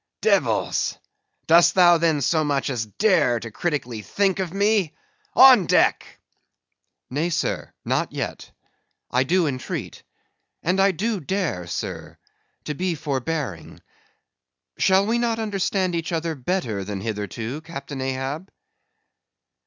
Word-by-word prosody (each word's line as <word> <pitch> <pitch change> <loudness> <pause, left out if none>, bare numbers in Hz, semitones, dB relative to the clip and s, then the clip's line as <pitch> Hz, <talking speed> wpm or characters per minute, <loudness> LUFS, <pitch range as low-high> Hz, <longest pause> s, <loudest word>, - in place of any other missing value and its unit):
"Devils! - - +1 0.5
Dost 170 +1 +5
thou 175 -2 +6
then 160 -3 +2
so 155 +4 +2
much 140 -2 0
as 115 -4 -3
dare 150 - +2
to 115 0 -8
critically 125 -7 -3
think 195 - 0
of 185 -3 -2
me?—On 220 - +3
deck!" - - +2 0.9
"Nay, 155 +6 0
sir, 170 - -2
not - - 0
yet; - - -5 0.6
I 125 +1 +3
do 175 +5 +2
entreat. 130 -3 -4 0.6
And 180 +3 +1
I 195 +1 +5
do 205 +4 -2
dare, 160 - -2
sir—to 150 - -8
be 180 +3 -2
forbearing! 140 - -4 1.0
Shall 190 +1 +4
we 230 +3 +1
not 235 -1 0
understand 195 -4 -1
each 165 0 -3
other 165 0 -1
better 125 - -2
than 100 0 -5
hitherto, 110 - -4
Captain 140 -4 -7
Ahab?" 135 +7 -3
165 Hz, 120 wpm, -23 LUFS, 130-190 Hz, 1.0 s, thou